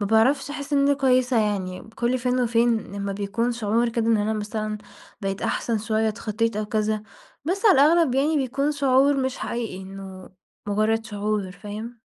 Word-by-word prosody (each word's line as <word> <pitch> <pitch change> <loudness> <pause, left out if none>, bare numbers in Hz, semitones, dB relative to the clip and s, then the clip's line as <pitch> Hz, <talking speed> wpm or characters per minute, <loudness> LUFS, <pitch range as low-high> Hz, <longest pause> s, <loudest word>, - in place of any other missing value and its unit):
ما 205 - 0
باعرفش 255 +7 +3
أحس 285 0 -6
إن 285 - +4
أنا 285 - +4
كويسة 255 -3 +3
يعني 195 -4 -2
كل 245 +2 0
فين 250 +1 0
وفين 235 -1 +3 0.2
لمّا 200 0 -3
بيكون 205 +4 -1
شعور 230 +1 +1
كده 230 -1 -1
إن 230 -1 +4
أنا 210 +1 0
مثلًا 215 0 -3 0.4
بقيت 195 0 -3
أحسن 230 -2 0
شوية، 220 +1 0
اتخطيت 220 0 -2
أو 215 - -1
كذا، 215 0 0 0.4
بس 375 +7 -2
على 410 - +8
الأغلب 310 -2 +4
يعني 295 +4 +2
بيكون 275 +2 0
شعور 280 0 +3
مش 260 -1 -1
حقيقي 225 -6 -4
إنه 190 -1 -10 0.4
مجرد 215 +2 +1
شعور، 210 -2 -2
فاهم؟ 215 +4 -8
225 Hz, 175 wpm, -24 LUFS, 210-255 Hz, 0.4 s, على